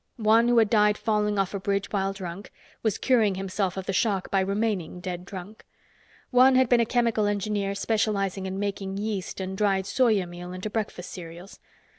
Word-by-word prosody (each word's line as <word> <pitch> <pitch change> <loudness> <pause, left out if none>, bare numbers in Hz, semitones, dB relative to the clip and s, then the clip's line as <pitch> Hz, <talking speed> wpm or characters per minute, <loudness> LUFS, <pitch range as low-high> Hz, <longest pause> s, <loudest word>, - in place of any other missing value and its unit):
One, 225 +1 +4
who 240 0 +3
had 220 -2 +4
died 210 -2 +4
falling 210 -1 0
off 195 0 0
a 200 - -2
bridge 200 +1 -1
while 195 -1 0
drunk, 190 0 -7 0.3
was 220 -4 0
curing 225 -7 +2
himself 190 0 -2
of 190 - -4
the 195 - -2
shock 195 -1 0
by 195 - +3
remaining 200 -2 -1
dead 180 0 -5
drunk. 195 +2 -9 0.7
One 255 +1 +6
had 260 -2 +4
been 245 - +5
a 230 - +2
chemical 230 -4 +1
engineer 205 -1 -1
specializing 200 -3 0
in 190 0 -4
making 195 -1 -3
yeast 205 -3 -3
and 190 0 -4
dried 195 -1 +1
soya 215 -4 +2
meal 175 +1 -8
into 185 +3 -5
breakfast 200 -5 -4
cereals. 175 +2 -10
200 Hz, 185 wpm, -26 LUFS, 190-215 Hz, 0.7 s, One